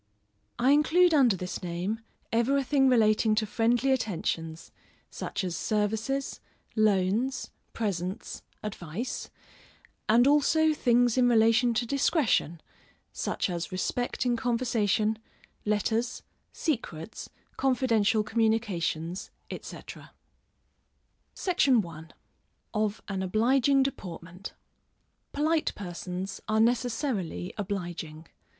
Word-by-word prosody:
_ - - -47 0.5
I 255 +3 +3
include 325 +4 +4
under 255 -8 +5
this 180 0 -5
name, 180 +5 -3 0.3
everything 270 +3 +3
relating 215 -2 +4
to 215 0 +1
friendly 240 +5 +1
attentions, 165 -8 -2 0.4
such - - -4
as 180 -2 -2
services, 220 +8 -1 0.4
loans, 215 +4 +1 0.2
presents, 195 -1 -3 0.2
advice, 210 +3 -5 0.8
and 235 +3 +6
also 305 +2 +4
things 245 -3 +3
in 245 -1 +5
relation 230 +1 +4
to 240 - +1
discretion, 245 - +1 0.5
such - - -1
as 170 -3 -4
respect 245 +8 -2
in 245 -1 +2
conversation, 225 -3 +1 0.5
letters, 220 +3 0 0.3
secrets, 220 - -4 0.3
confidential 230 -5 +2
communications, 210 -7 -1 0.2
&c. - - -4 1.8
SECTION 275 - +2
I. 160 -1 -9 0.7
Of 215 -1 -1
an 195 -2 -3
Obliging 255 +8 +3
Deportment. 180 -7 -6 0.8
Polite 310 +2 +1
persons 180 0 -5
are 215 0 +2
necessarily 230 - 0
obliging. 175 -6 -5
220 Hz, 95 wpm, -28 LUFS, 190-250 Hz, 1.8 s, and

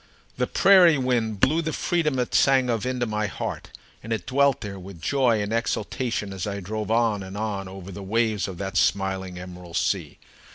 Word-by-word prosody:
The - - 0
prairie 180 -5 +6
wind 120 -5 0
blew 160 +4 +3
the 160 -1 -2
freedom 155 -6 0
it 125 -1 -1
sang 130 -2 +4
of 115 +2 -1
into 125 -1 -1
my 105 -1 -1
heart, - - -5 0.3
and 115 - -8
it 110 -5 -2
dwelt 140 +1 +2
there 100 -2 -6
with 95 -1 -10
joy 120 -1 +2
and 105 +2 -3
exultation 115 -2 -2
as 95 0 -4
I 100 0 -3
drove 105 +2 -4
on 115 -3 +2
and 95 +1 -7
on 100 -3 -3
over 95 0 -9
the 100 - -8
waves 110 0 0
of 95 -3 -7
that 95 0 -3
smiling 95 -1 0
emerald 90 -1 -7
sea. 90 -7 -1
105 Hz, 195 wpm, -25 LUFS, 95-125 Hz, 0.3 s, prairie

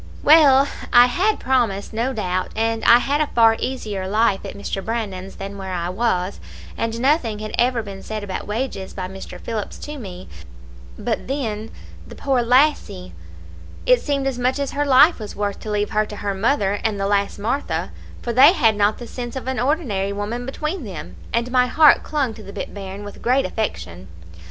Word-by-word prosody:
Well, 285 -3 +7 0.2
I 240 0 +8
had 380 +12 +1
promised, 230 -7 0
no 235 +4 0
doubt 185 -6 -2
and 225 0 0
I 235 - +8
had 280 +4 0
a 305 - +1
far 225 -1 +6
easier 210 -7 -3
life 210 0 +1
at - - -7
Mr. 200 -1 -4
Brandon's 195 -5 -4
than 195 0 -7
where 190 -1 -5
I 175 0 -2
was, 185 -2 -1 0.4
and 230 0 -2
nothing 260 -5 +1
had 215 0 -6
ever 240 -1 +2
been 195 -2 -8
said 215 -1 -5
about 190 -2 -5
wages 210 -3 -4
by 185 -2 -4
Mr. 190 +1 -9
Phillips 220 -3 -5
to 295 -1 -7
me 185 -5 -9 0.7
but - - -3
then 225 -6 -3 0.4
the - - -11
poor 270 -2 0
little 240 -1 0
lassie, 250 -9 +2 0.7
it - - +4
seemed 280 -2 -1
as 265 -2 -2
much 255 +2 +1
as 280 -1 -2
her 290 +1 -1
life 280 +4 +6
was 210 -2 -7
worth 205 -1 -2
to 215 - -8
leave 210 0 -1
her 215 0 +1
to 210 - -8
her 200 -1 -3
mother 205 -1 +1
and 215 -2 -1
the 195 - 0
lass 200 0 0
Martha, 235 +8 -2 0.3
for 235 - -2
they 275 +8 +8
had 230 - +3
not 205 +1 +2
the 240 - -8
sense 240 +1 -7
of 260 -1 -6
an 260 -1 -1
ordinary 245 - 0
woman 215 +5 -4
between 305 +5 -3
them, 155 - -8 0.2
and 235 +2 -1
my 250 0 +3
heart 300 +3 +6
clung 280 -6 -1
to 220 - -12
the 200 -1 -10
bit - - -6
bairn 195 0 -7
with 205 - -10
great 255 +3 +2
affection. 90 - -4
225 Hz, 200 wpm, -21 LUFS, 200-260 Hz, 0.7 s, I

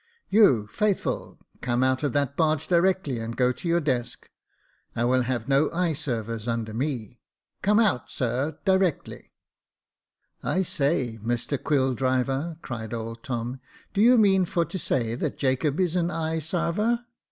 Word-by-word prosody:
" - - -45
You, 190 - +5
Faithful, 200 - -1 0.2
come 125 0 +1
out 130 0 +2
of 145 -3 0
that 140 -1 0
barge 155 -2 +1
directly, 175 -7 +2
and 115 +1 -5
go 125 -1 +3
to 150 - -6
your 170 +1 +3
desk. 125 -5 -3 0.6
I 120 - +1
will 130 +1 +3
have 120 -2 -2
no 140 +2 +3
eye 175 -1 0
servers 115 -6 -3
under 115 -2 -2
me. 120 -3 -3 0.4
Come 210 +2 +3
out, 200 - +2
sir, 130 +5 -2
directly," 190 -5 0 0.6
*' - - -48
I 190 - +2
say, 140 -8 0
Mr 120 +4 -2
Quilldriver," 135 +2 0
cried 115 -2 -5
old 115 0 -6
Tom, 120 +1 -4 0.2
" - - -27
do 200 - +1
you 245 +3 +7
mean 195 -4 +4
for 170 0 0
to 190 +4 -5
say 115 -6 -1
that 120 - -3
Jacob 135 +4 0
is 180 -2 +1
an 175 -1 +1
eye 160 -1 -1
sarver 180 - 0
140 Hz, 165 wpm, -26 LUFS, 120-170 Hz, 0.6 s, you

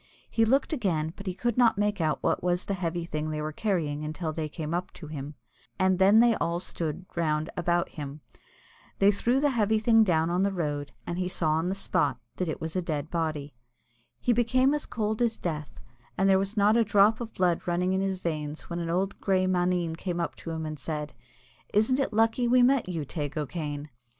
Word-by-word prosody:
He 225 - +3
looked 270 +7 +2
again, 165 - -1
but 195 - -10
he 185 - -2
could 240 +4 -1
not 230 -4 +5
make 205 -2 0
out 155 -1 0
what - - +1
was 180 0 0
the 200 - -1
heavy 175 -2 -2
thing 155 -2 -3
they 155 0 -3
were 155 0 -3
carrying 155 -6 -1
until 155 +1 -3
they 155 -1 -3
came 155 +1 -5
up 180 +1 -2
to 165 - -10
him, 145 -1 -7 0.4
and 185 0 +2
then 200 +4 +7
they 235 -1 +5
all 170 +1 -1
stood 170 -1 -4
round 155 -2 0
about 175 0 +1
him. 145 0 -7 0.8
They 200 +1 +5
threw 240 +6 +1
the 290 0 +2
heavy 220 -3 +2
thing 225 +1 +5
down 165 -4 +2
on 180 +2 +1
the 200 +1 +2
road, 145 -6 -3
and 175 +1 -3
he 180 - 0
saw 165 -3 0
on 160 +3 +1
the 190 - -1
spot 195 - 0 0.2
that 180 - -1
it 155 - -3
was 160 +1 -5
a 185 - +1
dead 155 -2 -3
body. 155 -4 -2 0.7
He 245 - +2
became 255 +4 +3
as 295 - -2
cold 215 0 -2
as 230 -2 +2
the - - -25
Death, 155 -4 -4 0.4
and 195 - +3
there 190 -1 +5
was 195 +3 -3
not 205 +2 +5
a 235 - +5
drop 210 +1 +4
of 230 -1 -6
blood 180 -2 +2
running 180 +2 +1
in 190 - +1
his 195 -1 -1
veins 155 -3 -4
when 170 - -2
an 170 -1 -3
old 185 +3 +1
little - - -19
grey 185 -1 +2
maneen 180 -2 +1
came 175 +1 -3
up 170 - -1
to - - -8
him 160 -1 -3
and 155 -1 -5
said, 150 +1 -4 0.6
"Isn't 225 +6 +3
it 275 - 0
lucky 225 +3 +2
we 250 +1 +5
met 255 -5 +3
you, 165 -5 -3
Teig 150 0 -4
O'Kane?" 150 -1 -4
180 Hz, 225 wpm, -28 LUFS, 155-210 Hz, 0.8 s, then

